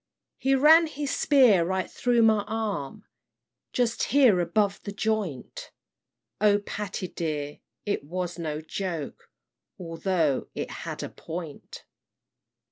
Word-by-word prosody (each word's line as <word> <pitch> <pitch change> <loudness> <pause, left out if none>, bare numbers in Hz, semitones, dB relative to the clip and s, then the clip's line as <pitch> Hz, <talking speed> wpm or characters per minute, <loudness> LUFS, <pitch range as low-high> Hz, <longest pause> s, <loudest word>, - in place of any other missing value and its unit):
"He 270 0 +2
ran 320 +5 +7
his 290 -2 -3
spear 250 - +5
right 190 +1 -1
through 240 -2 +1
my 220 -2 +4
arm, 215 -4 -4 0.7
Just 235 -2 0
here 255 -9 +5
above 200 +3 +1
the 200 - -6
joint; 205 - -3 0.7
O 205 -1 +5
Patty 205 -2 -5
dear, 150 -4 -4 0.3
it 205 -7 -1
was 175 +2 -4
no 155 -2 -3
joke, 165 -2 -5 0.5
Although 165 -4 -1
it - - -4
had - - -6
a - - -5
point. 160 -3 -8
200 Hz, 120 wpm, -26 LUFS, 165-225 Hz, 0.7 s, ran